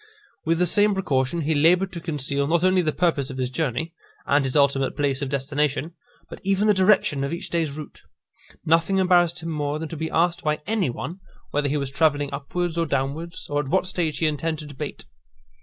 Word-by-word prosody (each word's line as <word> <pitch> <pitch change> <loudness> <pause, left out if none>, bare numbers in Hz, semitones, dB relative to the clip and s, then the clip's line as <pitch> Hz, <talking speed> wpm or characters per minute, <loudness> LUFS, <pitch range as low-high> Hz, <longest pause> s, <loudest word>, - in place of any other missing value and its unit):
With 165 +1 +2
the 180 - +3
same 205 +3 +3
precaution 150 -4 0
he 160 +1 +1
laboured 175 +6 +3
to 170 - -7
conceal, 140 -3 -1
not 170 +2 +2
only 185 0 +4
the 155 -3 0
purpose 155 -6 0
of 130 - -7
his 130 -1 -2
journey, 160 +3 -2 0.3
and 145 0 +3
his 130 -1 -2
ultimate 140 -2 +2
place 140 -2 0
of 140 - -2
destination, 145 +3 -1 0.3
but - - -10
even 195 +1 +1
the 210 - +5
direction 190 -7 +3
of 140 - -2
each 170 - -5
day's 165 -2 +1
route. 150 +1 -9 0.6
Nothing 165 +4 +3
embarrassed 175 -2 +3
him 165 - -4
more 150 -1 -2
than 160 0 -5
to 165 - -6
be 160 +1 -3
asked 175 +1 +1
by 150 0 0
any 210 - 0
one, 155 +9 -6 0.3
whether 145 0 0
he 150 - 0
was 140 -2 -3
travelling 145 -1 +1
upwards 170 +4 -2
or 165 - +1
downwards, 145 +5 -3
or 145 0 -1
at 145 - -2
what 185 +5 +1
stage 170 -5 -1
he 165 - 0
intended 155 0 -2
to 145 - -11
bait. - - -6
155 Hz, 210 wpm, -24 LUFS, 140-175 Hz, 0.6 s, the